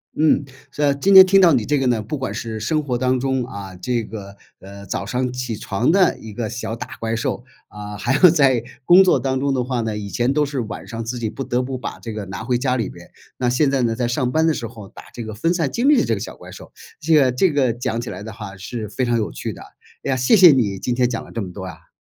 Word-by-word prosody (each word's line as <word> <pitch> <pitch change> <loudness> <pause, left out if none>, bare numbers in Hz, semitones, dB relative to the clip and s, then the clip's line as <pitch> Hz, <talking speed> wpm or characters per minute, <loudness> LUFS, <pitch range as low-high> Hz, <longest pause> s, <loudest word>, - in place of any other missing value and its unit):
嗯， 150 -2 +3 0.3
是 145 -1 +1
今 195 +8 +2
天 190 -1 +12
听 195 +1 +5
到 170 -4 +6
你 125 -5 +2
这 145 +4 +1
个 135 - 0
呢， 120 -3 +1
不 110 +8 -5
管 130 - -4
是 110 -2 -5
生 155 +8 0
活 125 -4 -2
当 130 0 +1
中， 130 -1 0
啊， 100 -6 -8
这 115 +6 -2
个， 100 -2 -9 0.2
呃， 100 +1 -11
早 100 - -4
上 125 +3 -2
起 125 -3 -4
床 105 +7 0
的 185 0 +3
一 110 -2 -10
个 115 -2 -3
小 115 -1 -4
打 - - -7
怪 115 0 -2
兽， 120 +1 -3 0.2
啊， 105 0 -8
还 135 +2 0
有 180 +4 +7
在 135 -7 +3 0.2
工 180 +2 +8
作 185 - +3
当 130 -1 -1
中 140 0 0
的 130 -2 0
话 125 -1 -2
呢， 110 -1 -3
以 100 -1 -6
前 120 +8 0
都 150 0 +2
是 140 -2 -4
晚 110 - -7
上 115 0 -5
自 120 +1 -4
己 110 - -2
不 135 +5 -6
得 125 0 -1
不 130 +1 -4
把 125 - -7
这 115 - -7
个 105 -1 -5
拿 95 +3 -7
回 125 0 0
家 125 0 0
里 115 -5 -2
面。 - - -14 0.3
那 125 - -1
现 135 +3 +2
在 135 -2 +1
呢， 115 -1 +1
在 120 0 -1
上 125 0 -1
班 160 +2 +2
的 160 - +3
时 120 - -4
候 110 -3 -10
打 - - -13
这 120 - -6
个 110 -1 -7
分 165 +10 0
散 165 -6 0
经 245 +4 0
历 295 -3 +6
的 - - +1
这 115 - 0
个 100 - -5
小 - - -7
怪 - - -13
兽。 - - -12 0.3
这 160 +2 +1
个 135 -5 +5
这 165 +8 +2
个 135 -5 +2
讲 115 -1 -3
起 120 - -6
来 100 - -7
的 110 - -7
话 100 -3 -9
是 105 +3 -6
非 130 +4 -2
常 120 -1 +1
有 110 - -2
趣 - - -5
的。 - - -12 0.4
哎 - - -3
呀， 135 - +2
谢 130 - +3
谢 180 -4 +9
你 105 -8 +1
今 120 +4 -2
天 125 -1 +2
讲 115 -2 -4
了 - - -14
这 115 - -4
么 90 - -7
多 95 -1 -7
呀！ 90 - -12
125 Hz, 310 characters per minute, -21 LUFS, 110-140 Hz, 0.4 s, 天